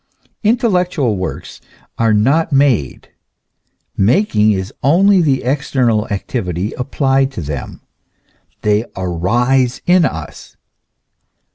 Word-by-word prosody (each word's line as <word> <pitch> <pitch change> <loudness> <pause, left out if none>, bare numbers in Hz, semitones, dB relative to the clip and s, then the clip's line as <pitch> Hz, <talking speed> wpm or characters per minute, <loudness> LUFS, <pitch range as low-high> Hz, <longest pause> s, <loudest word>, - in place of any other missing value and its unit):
Intellectual 180 - +1
works 95 -1 -6 0.4
are 115 -1 +2
not 135 +11 +2
made, 135 - +1 0.9
making 110 - +2
is 95 -1 -3
only 185 +7 +4
the 140 -5 +1
external 125 -4 0
activity 95 -2 -3
applied 135 +1 0
to - - -5
them; 70 -2 -6 0.8
they 105 +2 +1
arise 120 +9 0
in 180 0 +4
us. 80 - -5
125 Hz, 95 wpm, -16 LUFS, 105-145 Hz, 0.9 s, only